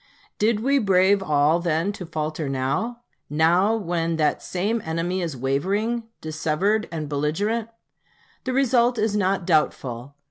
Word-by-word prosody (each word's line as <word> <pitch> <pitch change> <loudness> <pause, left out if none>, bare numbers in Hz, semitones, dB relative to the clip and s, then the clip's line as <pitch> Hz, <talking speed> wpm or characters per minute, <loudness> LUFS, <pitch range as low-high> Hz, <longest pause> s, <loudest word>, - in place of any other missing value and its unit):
Did 215 0 +2
we 275 +3 +3
brave 195 -1 +3
all 150 -1 +3
then 170 +2 0
to 190 -4 -8
falter 155 -2 -3
now? 135 - -2 0.3
now, 175 +8 +3
when 170 -5 -1
that 155 -2 +1
same 210 +5 -1
enemy 165 +3 -2
is 165 -6 -3
wavering, 200 - -1 0.2
dissevered, 160 +7 0
and 155 -3 -4
belligerent? 200 +11 -1 0.8
The 255 - -1
result 250 -2 +3
is 215 -1 0
not 195 -2 +1
doubtful. 140 -6 0
180 Hz, 135 wpm, -24 LUFS, 155-215 Hz, 0.8 s, we